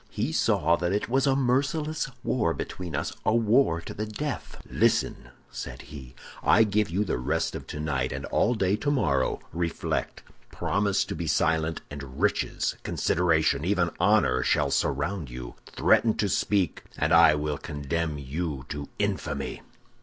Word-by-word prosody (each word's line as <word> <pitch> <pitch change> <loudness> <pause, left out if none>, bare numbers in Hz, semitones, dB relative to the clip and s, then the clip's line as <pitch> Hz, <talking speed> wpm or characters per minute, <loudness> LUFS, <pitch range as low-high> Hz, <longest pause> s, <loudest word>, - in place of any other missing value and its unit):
"He - - -2
saw 85 +3 +2
that 90 +1 -1
it 105 - -1
was 135 +3 +2
a 135 - +3
merciless 140 +4 0
war 105 -10 +1
between 90 -5 -5
us—a 110 +9 -1
war 115 -6 +3
to - - -8
the 110 +1 -4
death. 140 +7 -5
"'Listen!' - - +1 0.2
said - - -7
he. 65 -3 -11 0.3
'I 115 - +5
give 105 0 +1
you 95 +5 0
the 75 - -1
rest 65 - -1
of - - -7
tonight 75 -4 -2
and 65 +1 -4
all 120 +3 +1
day 100 -2 +2
tomorrow. 130 - +1
Reflect: 85 0 -2 0.3
promise 100 -1 0
to - - -5
be 85 - -4
silent, 80 +1 +1
and 70 -1 -8
riches, 105 +2 0
consideration, 80 -4 +1
even 90 -1 +1
honor, 90 -10 +3
shall 70 +2 +1
surround 75 +4 -1
you; - - -7
threaten 110 -2 +3
to 105 - +1
speak, 95 -2 0
and 75 +2 +1
I 80 -2 +7
will 75 -1 -2
condemn 75 +2 -3
you 70 0 -4
to 75 -1 -5
infamy. - - -2
85 Hz, 155 wpm, -27 LUFS, 75-105 Hz, 0.3 s, I